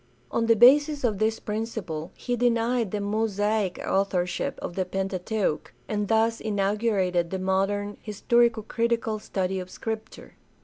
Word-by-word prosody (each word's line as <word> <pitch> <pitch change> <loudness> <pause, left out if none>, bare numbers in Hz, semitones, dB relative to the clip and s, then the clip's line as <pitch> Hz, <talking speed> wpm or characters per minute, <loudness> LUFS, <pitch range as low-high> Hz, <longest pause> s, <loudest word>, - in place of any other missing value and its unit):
On 230 0 0
the 230 - +6
basis 285 +5 +5
of 215 -5 0
this 220 +1 +1
principle 210 -7 -4
he 245 - -2
denied 235 -1 +1
the 210 - -2
Mosaic 205 -1 0
authorship 185 -2 0
of - - -5
the 185 - 0
Pentateuch, 190 -1 -2 0.2
and 210 -1 -1
thus 225 +1 +2
inaugurated 200 -4 0
the 190 - -2
modern 195 +2 -1
historico 225 +1 +1
critical 230 -2 0
study 190 -2 -2
of 180 0 -7
Scripture. 220 +2 -7
210 Hz, 135 wpm, -26 LUFS, 190-230 Hz, 0.2 s, the